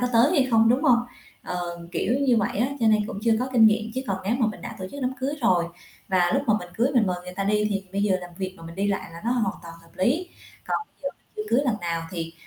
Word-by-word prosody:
có 250 - +2
tới 235 +5 +5
hay 275 -7 +3
không, 225 -1 +5
đúng 250 +4 +3
hông? 250 -5 +6 0.4
Ờ, 175 -1 -4
kiểu 235 - 0
như 255 -4 +4
vậy 200 -2 0
á, 245 +4 +2
cho 225 - +3
nên 215 -1 +4
cũng - - -5
chưa 230 0 +3
có 255 +2 -1
kinh 230 -3 +6
nghiệm, 220 +1 +2
chứ 260 - -1
còn 195 - 0
nếu 215 +5 +1
mà 230 - +4
mình 215 - -4
đã - - -7
tổ 185 - -5
chức 285 - -7
đám 255 +1 0
cưới 280 +3 -1
rồi 180 -8 +3 0.4
và 180 -2 +3
lúc 275 - +2
mà 215 - +4
mình 180 - -9
cưới 240 +6 +2
mình 230 -5 +4
mời 180 - 0
người 180 0 -8
ta 195 - -2
đi 210 +1 +2
thì 195 -1 -1
bây 200 - 0
giờ 200 -2 +3
làm 180 - -9
việc 190 -1 -3
mà 165 - -13
mình 165 - -9
đi 200 +2 0
lại 195 -4 -2
là 170 - -9
nó 235 - +1
hoàn 220 -5 +1
toàn 165 -1 -9
hợp 165 - -20
lý. 300 - +1 0.4
Còn - - +1 0.2
giờ - - 0 0.3
chưa 425 - -2
cưới 245 - +4
lần 240 -6 +1
nào 170 -1 -2
thì, 165 -2 -4
215 Hz, 295 wpm, -25 LUFS, 185-245 Hz, 0.4 s, hông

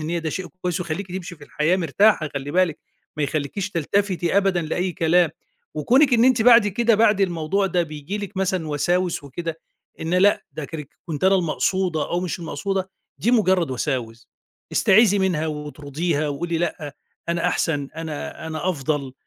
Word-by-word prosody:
النية 165 +3 -2
ده 160 -1 -3
شيء 185 +2 -4 0.2
كويس 180 0 -1
ويخليكِ 175 +3 -4
تمشي 180 -2 -6
في 145 - -13
الحياة 155 +5 +1
مرتاحة 175 0 +3
خلّي 140 +1 -4
بالِك، 175 -1 +1 0.4
ما 150 - -1
يخليكيش 155 +8 -2
تلتفتي 185 +2 0
أبدًا 190 -3 +2
لأي 175 +3 -2
كلام. 170 -1 +3 0.4
وكونِك 255 - +4
إن 230 +1 +4
أنتِ 255 -4 +4
بعد 235 -3 +7
كده 230 +3 +2
بعد 210 -2 +3
الموضوع 185 +2 +1
ده 180 -1 +1
بييجي 155 +5 -6
لِك 200 -1 -7
مثلًا 185 -4 -1
وساوس 175 +2 0
وكده 165 +3 -5 0.4
إن 165 +3 -1
"لأ، 200 +3 +4
ده 150 0 -5
كانك 150 -2 -7 0.2
كنت 160 +1 -3
أنا 195 +1 +5
المقصودة 180 -1 0
أو 175 - 0
مش 180 -1 -3
المقصودة" 190 +3 -3 0.3
دي 235 - +1
مجرد 190 - +3
وساوس. 120 -3 -3 0.4
استيعذي 205 0 +5
منها 175 -5 +1
واطرديها 150 +1 -3
وقولي 165 +4 -2
"لأ، 155 -4 -3 0.3
أنا 170 0 0
أحسن، 145 -4 -1
أنا 160 -1 -6
أنا 160 +3 -3
أفضل" 140 -3 -2
170 Hz, 165 wpm, -22 LUFS, 155-190 Hz, 0.4 s, بعد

